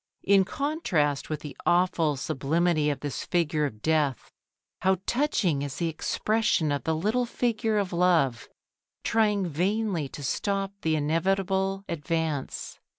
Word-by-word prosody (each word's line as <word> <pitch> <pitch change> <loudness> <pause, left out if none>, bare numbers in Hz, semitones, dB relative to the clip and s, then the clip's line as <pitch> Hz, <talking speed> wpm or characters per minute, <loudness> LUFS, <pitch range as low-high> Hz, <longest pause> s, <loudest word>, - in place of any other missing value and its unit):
In 195 -1 +5
contrast 185 - -1
with 155 -1 -3
the 150 - -8
awful 175 -4 +2
sublimity 155 +3 +1
of 145 - -2
this 145 -3 -4
figure 155 -3 +1
of 110 -5 -11
Death, 150 -5 0 0.5
how 190 0 +2
touching 220 - +1
is 140 -1 -4
the 170 -2 -1
expression 205 0 0
of 145 - -2
the 160 0 +1
little 220 +9 0
figure 225 -3 0
of 195 -3 -1
Love, 170 -9 +2 0.5
trying 210 -3 +2
vainly 180 -1 -1
to 145 - -8
stop 195 +7 -1
the 160 -1 +1
inevitable 190 +5 0
advance. 160 -3 -3
170 Hz, 135 wpm, -27 LUFS, 150-195 Hz, 0.5 s, In